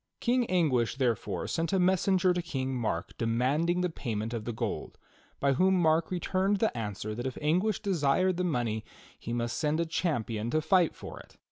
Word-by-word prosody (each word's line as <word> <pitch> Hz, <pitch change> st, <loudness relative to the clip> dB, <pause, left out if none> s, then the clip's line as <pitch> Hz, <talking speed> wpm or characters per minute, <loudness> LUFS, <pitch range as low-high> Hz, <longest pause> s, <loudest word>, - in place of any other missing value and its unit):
King 245 Hz, -1 st, +1 dB
Anguish, 145 Hz, -11 st, +2 dB
therefore, 125 Hz, -6 st, -1 dB
sent 165 Hz, +2 st, -1 dB
a -, -, +4 dB
messenger 185 Hz, 0 st, +3 dB
to 175 Hz, -, -1 dB
King 135 Hz, -6 st, -3 dB
Mark 110 Hz, -9 st, -2 dB
de 115 Hz, -, 0 dB
manding 145 Hz, +10 st, +1 dB
the 180 Hz, -, +1 dB
payment 115 Hz, -6 st, -3 dB
of 110 Hz, -2 st, -4 dB
the 120 Hz, -, -2 dB
gold, 110 Hz, -, -4 dB, 0.4 s
by 140 Hz, 0 st, +2 dB
whom 190 Hz, +7 st, +3 dB
Mark 160 Hz, -1 st, +3 dB
returned 190 Hz, +2 st, 0 dB
the 220 Hz, +2 st, 0 dB
answer 105 Hz, -2 st, -4 dB
that 120 Hz, +4 st, -3 dB
if 130 Hz, -, -5 dB
Anguish 180 Hz, +8 st, +1 dB
desired 185 Hz, -1 st, +2 dB
the 180 Hz, -, 0 dB
money 120 Hz, -10 st, -1 dB, 0.4 s
he -, -, -6 dB
must 120 Hz, 0 st, -2 dB
send 155 Hz, 0 st, +1 dB
a 170 Hz, -, +1 dB
champion 120 Hz, -, -1 dB
to 155 Hz, -, +2 dB
fight 175 Hz, +1 st, +3 dB
for -, -, -9 dB
it. -, -, -16 dB
155 Hz, 195 wpm, -29 LUFS, 120-180 Hz, 0.4 s, a